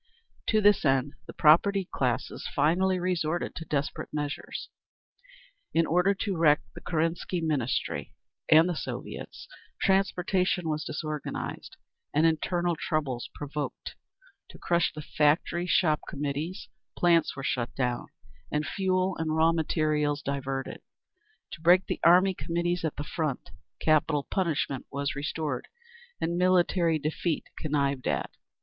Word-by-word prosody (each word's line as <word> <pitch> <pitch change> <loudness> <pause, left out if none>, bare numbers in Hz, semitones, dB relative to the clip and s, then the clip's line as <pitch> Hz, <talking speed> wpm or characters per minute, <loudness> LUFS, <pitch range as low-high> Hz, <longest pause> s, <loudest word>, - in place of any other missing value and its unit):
To 215 -1 +3
this 205 0 +5
end 135 0 +2
the - - -8
propertied 190 +5 +4
classes 125 -1 -2
finally 180 +6 +3
resorted 175 -2 -1
to 165 - -7
desperate 145 -2 -2
measures. 145 -1 -4 1.1
In 165 0 +4
order 180 +5 +3
to 195 0 -2
wreck 155 -3 +4
the - - -10
Kerensky 165 +2 -1
Ministry 145 -7 -2 0.3
and 160 +2 +7
the 175 - -1
Soviets, - - -6 0.3
transportation 185 -2 +1
was 155 -1 -1
disorganised 155 -1 -5 0.4
and 155 +2 +4
internal 175 +2 +1
troubles 145 -6 -2
provoked; 145 0 -5 0.5
to - - -12
crush 170 -1 +1
the 150 - -8
Factory 155 +4 +1
Shop 155 -4 +3
Committees, 150 +7 -4 0.3
plants 170 -1 +3
were 135 - -6
shut 120 -3 -2
down, 125 -2 -1 0.4
and 150 +1 0
fuel 185 -1 0
and 155 -1 -1
raw 160 +1 +4
materials 150 -2 0
diverted; 135 -1 -3 0.7
to 160 - -9
break 175 +3 +5
the - - -3
Army 180 +3 +6
Committees 175 0 -2
at 160 - -1
the 145 - -4
front, 150 -3 -3 0.3
capital 155 -2 +2
punishment 155 -7 -1
was 140 +1 -2
restored 145 -2 -3 0.5
and 170 +1 -1
military 180 -2 +3
defeat 155 +2 -2
connived 140 -3 -1
at. - - -1
160 Hz, 130 wpm, -28 LUFS, 145-175 Hz, 1.1 s, and